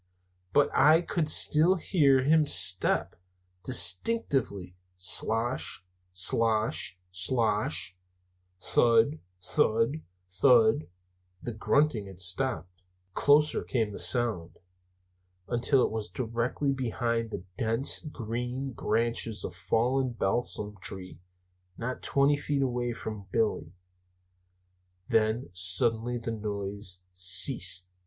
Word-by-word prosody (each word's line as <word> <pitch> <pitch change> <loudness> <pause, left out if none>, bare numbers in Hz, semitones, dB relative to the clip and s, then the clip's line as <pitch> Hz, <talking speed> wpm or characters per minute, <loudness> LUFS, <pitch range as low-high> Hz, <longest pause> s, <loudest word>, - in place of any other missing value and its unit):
But 145 +7 +2
I 155 +5 +4
could 170 -3 -3
still 160 +5 +5
hear 145 -7 +2
his 155 +1 +3
steps - - +3 0.5
distinctly 100 - +2 0.2
slosh, 110 +4 +1 0.3
slosh, 110 +1 0
slosh 95 -4 0 0.6
thud, 115 - +2 0.2
thud, 115 - 0 0.3
thud 110 - +2 0.6
(the 120 - -5
grunting 115 -1 0
had 95 -2 -13
stopped) 90 -2 -2 0.3
closer 150 +6 +2
came 115 -5 -2
the - - -8
sound, 115 -9 0 0.9
until 125 +2 +1
it - - -1
was 110 -1 -5
directly 120 +4 -3
behind 115 -3 -3
the 90 - -7
dense 115 +5 +1
green 125 -1 -6
branches 115 -2 -2
of - - -6
a - - -17
fallen 125 +2 -1
balsam 105 -1 -2
tree, 95 -1 -6 0.6
not 125 +2 -6
twenty 140 +1 +1
feet 145 -1 -2
away 120 -2 -2
from 110 -4 -8
Billy. 110 -7 -2 1.4
Then 110 -2 0
suddenly 115 +6 0
the 115 -1 -6
noise 100 -3 -4
ceased. 90 +1 +3
115 Hz, 100 wpm, -27 LUFS, 100-130 Hz, 1.4 s, still